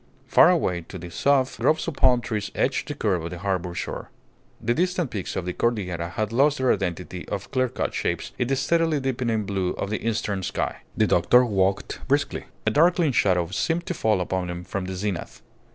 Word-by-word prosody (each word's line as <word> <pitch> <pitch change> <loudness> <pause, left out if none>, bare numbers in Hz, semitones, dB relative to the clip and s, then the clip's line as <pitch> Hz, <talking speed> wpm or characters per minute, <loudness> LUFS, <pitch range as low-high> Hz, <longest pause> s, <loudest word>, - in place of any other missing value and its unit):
Far - - +6
away 90 -1 +1
to 95 - -7
the 85 0 -8
south 135 +7 +2
groves 155 +2 +2
of 165 - -2
palm 125 -3 +4
trees 105 -3 -3
edged 135 0 0
the 145 - -4
curve 95 - 0
of 85 - -4
the 90 - -6
harbour 90 -2 -2
shore. - - -5 0.5
The 120 - +1
distant 180 -1 0
peaks 100 -4 -4
of 90 - -2
the 90 - -2
Cordillera 90 -8 -1
had 110 +4 -3
lost 140 +4 +4
their 130 -1 +3
identity 90 -2 -4
of 100 -2 -5
clearcut 130 -2 0
shapes - - -2
in 125 - +1
the 135 - +1
steadily 160 +3 +2
deepening 125 -5 -1
blue 95 -2 -1
of 100 - -4
the 110 - -2
eastern 110 -3 -1
sky. 90 - -2 0.2
The - - +4
doctor 125 +9 +5
walked 95 -3 0
briskly. - - 0 0.2
A - - +3
darkling 170 0 +4
shadow 90 -7 +3
seemed 165 - -1
to - - -2
fall 110 - +1
upon 90 0 -2
him 90 0 -5
from 95 +1 -4
the 95 0 -4
zenith. 95 -1 -4
105 Hz, 200 wpm, -25 LUFS, 90-130 Hz, 0.5 s, Far